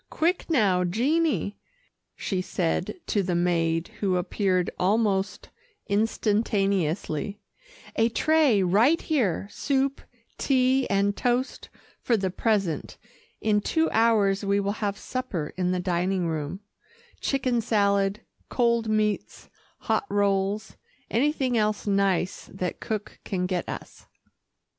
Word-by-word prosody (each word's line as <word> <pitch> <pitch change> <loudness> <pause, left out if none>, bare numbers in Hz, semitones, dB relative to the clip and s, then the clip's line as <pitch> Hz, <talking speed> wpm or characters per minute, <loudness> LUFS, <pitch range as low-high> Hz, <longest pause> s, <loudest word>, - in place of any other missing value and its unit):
"Quick 345 +3 0
now, 200 - +3
Jeannie," 255 - 0 0.6
she 190 -2 -2
said 180 -1 -1
to 205 - +1
the 180 -2 -1
maid 165 -1 +1
who 190 -3 +1
appeared 185 0 0
almost 200 0 +1 0.4
instantaneously; 200 -5 0 0.6
"a 225 +1 +3
tray 290 -6 +3
right 225 - +4
here 215 - 0
soup, 275 -1 0 0.4
tea 260 -1 +2
and 200 +1 +2
toast, 250 +2 -1 0.3
for 235 - +2
the 190 -2 -1
present. 195 -6 -1 0.4
In 210 -1 +2
two 320 +9 +1
hours 215 -3 +3
we 200 0 +2
will 200 0 0
have 200 -1 -1
supper 205 -14 -4
in 180 -1 0
the 185 - 0
dining 180 +1 0
room 160 +3 -3 0.6
chicken 255 -3 0
salad, 200 -2 +1 0.3
cold 235 -2 +1
meats, 215 -1 -1 0.3
hot 405 - 0
rolls, 200 +1 0 0.3
anything 265 0 +1
else 210 -1 0
nice 195 -3 0
that 185 -2 -4
cook 215 -2 -5
can 180 -2 -2
get 180 -1 -2
us." - - -8
200 Hz, 115 wpm, -26 LUFS, 185-235 Hz, 0.6 s, right